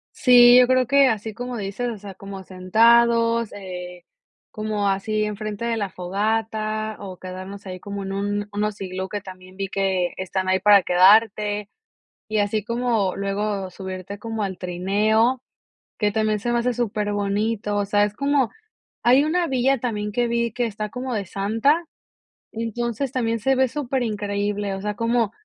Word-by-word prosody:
Sí, 245 -1 +7
yo 250 - +7
creo 255 -1 +3
que, 280 -1 +5
así 220 -1 -2
como 245 +1 -5
dices, 205 +4 -3
o 235 - -4
sea, 200 -1 -9
como 195 0 -9
sentados, 230 +4 +3
eh, 180 -2 -8 0.5
como 215 -1 -2
así 215 +2 0
enfrente 210 +1 -4
de 235 -1 0
la 205 -3 -2
fogata, 215 +3 -2
o 190 -2 -8
quedarnos 185 +2 -8
ahí 185 -1 -6
como 200 0 -6
en 195 0 -5
un 205 +1 -2
unos 210 0 -2
iglú 190 0 -4
que 205 +1 -4
también 185 -1 -12
vi 195 -1 -3
que 190 -2 0
están 190 0 -3
ahí 190 0 +3
para 200 +1 +6
quedarte. 205 +3 +4 0.6
Y 215 - -1
así 205 +1 0
como 235 -5 0
luego 200 0 -2
subirte 190 +1 -7
como 225 -1 -4
al 190 -2 -4
trineo, 210 +7 +1 0.6
que 210 -1 +2
también 215 0 0
se 240 +4 -2
me 240 - +2
hace 245 +1 0
súper 210 -3 -2
bonito, 205 +1 -1
o 205 - 0
sea, 205 +1 +2
es 205 0 -1
como 280 -2 +1 0.5
hay 255 +4 +5
una 340 +3 +1
villa 265 0 +1
también 210 -3 -3
que 240 +3 0
vi 235 0 0
que 245 +1 0
está 210 -1 -5
como 250 +3 -5
de 205 -3 -2
Santa, 225 - +1 0.7
entonces 235 +3 -3
también 230 -2 0
se 265 +5 +2
ve 260 0 +3
súper 265 -2 -2
increíble, 205 -2 -2
o 195 - -6
sea, 210 +1 -3
como 230 0 +1
210 Hz, 170 wpm, -23 LUFS, 195-235 Hz, 0.7 s, Sí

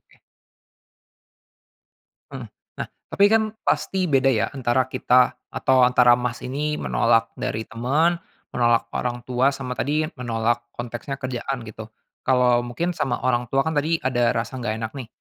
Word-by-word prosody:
Oke. - - -28 2.1
Mhm, - - -7 0.3
nah, - - -5 0.2
tapi 200 - +3
kan, 220 0 +4 0.2
pasti 190 -1 0
beda 135 -1 +3
ya, 105 -5 +1
antara 130 -2 +1
kita, 125 0 +4 0.2
atau 130 -1 +2
antara 125 -1 +5
Mas 125 0 -4
ini 150 +4 -2
menolak 115 -5 +1
dari 110 +1 -2
teman, 150 +10 0 0.3
menolak 120 -1 +1
orang 120 -1 -3
tua, 125 +1 +1
sama 130 -2 -6
tadi, 150 +3 +1 0.2
menolak 120 0 -1
konteksnya 120 +3 -5
kerjaan 130 -1 -4
gitu. 110 0 -9 0.4
Kalau, 125 -2 +4
mungkin 170 +9 -2
sama 135 -6 -2
orang 120 -1 +1
tua 135 +3 +1
kan 160 - -1
tadi 155 +2 +1
ada 120 -2 +1
rasa 125 +3 -3
nggak 110 -3 -2
enak 110 - -3
nih, 130 -5 -8
125 Hz, 150 wpm, -23 LUFS, 120-135 Hz, 2.1 s, antara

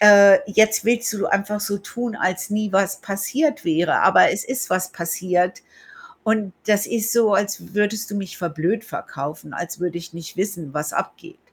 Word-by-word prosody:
äh, 200 -2 +9
jetzt 220 +1 +4
willst 235 0 +1
du 200 - -1
einfach 200 +1 0
so 200 -1 -2
tun, 230 +3 -5
als 185 +1 -2
nie 210 -1 -1
was 195 0 +1
passiert 285 +10 -1
wäre, 165 +1 +2
aber - - +6
es 200 - -3
ist 260 +1 -4
was 185 0 0
passiert 180 +1 -1 0.6
und 215 -4 0
das 210 -1 +2
ist 225 -1 -1
so, 225 -4 +4
als 200 -1 -2
würdest 210 +1 0
du - - -5
mich 195 -2 -6
für 175 -2 -2
blöd 175 +8 -1
verkaufen, 145 -6 -7
als 175 0 -6
würde 175 -1 -2
ich 170 -1 -12
nicht 165 -1 -9
wissen, 175 -8 -3
was 150 0 -3
abgeht. - - -5
200 Hz, 180 wpm, -21 LUFS, 180-215 Hz, 0.6 s, äh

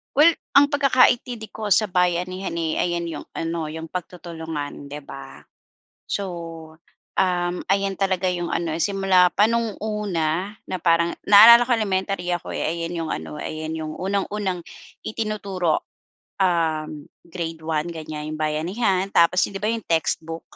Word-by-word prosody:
Well, 310 +4 +7 0.2
ang 285 +1 +6
pagkakaintindi 250 -5 +2
ko 215 -1 -5
sa 210 +2 +2
bayanihan, 180 +1 0
eh, 160 -1 -1
ayan 175 -1 0
yung - - -7
ano 165 -1 -2
yung 160 +1 -7
pagtutulungan, 160 -5 -6
'di 145 +1 -7
ba? 135 0 -11 0.6
So, 200 - -2 0.9
uhm, 175 -1 +1
ayan 195 0 +1
talaga 190 -1 +1
yung 175 -1 -3
ano 165 -2 -1
simula 190 -1 +3
pa 205 - +5
noong 230 -3 -1
una 195 -3 -1 0.2
na - - -1
parang, 170 0 +2
naalala 235 +4 +9
ko 255 - +1
elementary 195 -4 -1
ako, 175 - -6
eh, - - -2
ayan 170 +1 -3
yung - - -5
ano 150 - -5
ayan 155 0 -5
yung 155 -1 -5
unang-unang 195 0 -2 0.4
itinuturo. 200 -6 -2 0.6
Uhm, 160 -5 0 0.2
grade 165 -2 -5
1 155 -1 -1
ganyan 155 -1 -6
yung 155 - -6
bayanihan 180 +6 0
tapos 170 +2 +4
yun - - -4
'di - - -5
ba 210 - +1
yung 230 -1 -3
textbook 165 0 -1
180 Hz, 145 wpm, -23 LUFS, 160-200 Hz, 0.9 s, naalala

